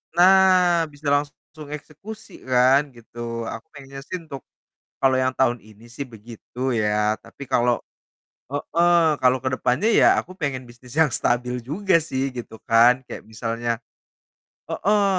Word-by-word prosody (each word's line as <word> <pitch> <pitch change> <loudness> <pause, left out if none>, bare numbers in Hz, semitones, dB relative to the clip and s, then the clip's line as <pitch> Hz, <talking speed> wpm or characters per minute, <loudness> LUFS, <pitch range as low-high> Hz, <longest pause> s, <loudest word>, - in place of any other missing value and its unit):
nah 180 -2 +5
bisa 145 +1 -9
langsung 145 +1 -3
eksekusi 160 +9 -11 0.2
kan, 130 +2 +5
gitu. 115 0 -7
Aku 115 +7 -8
pengen 135 -1 -10
sih 185 - -4
untuk 140 -5 -9 0.6
kalo 130 -1 +4
yang 130 0 0
tahun 120 -4 +1
ini 110 +2 -18
sih 140 +4 -6
begitu 120 +4 -5
ya, 105 0 +1
tapi 140 - -12
kalo 120 0 +2 0.7
heeh, 170 +3 +2
kalo 130 0 +4
kedepannya 130 - 0
ya - - +5
aku 185 - -5
pengen 130 -5 -3
bisnis 120 +2 -15
yang 155 -4 +4
stabil 125 +1 0
juga 170 - +1
sih, 135 -4 -3
gitu 120 -2 -7
kan. 115 +2 +6
Kayak - - -8
misalnya 115 +1 -4 1.0
heeh, 205 0 +1
130 Hz, 140 wpm, -23 LUFS, 120-160 Hz, 1.0 s, kan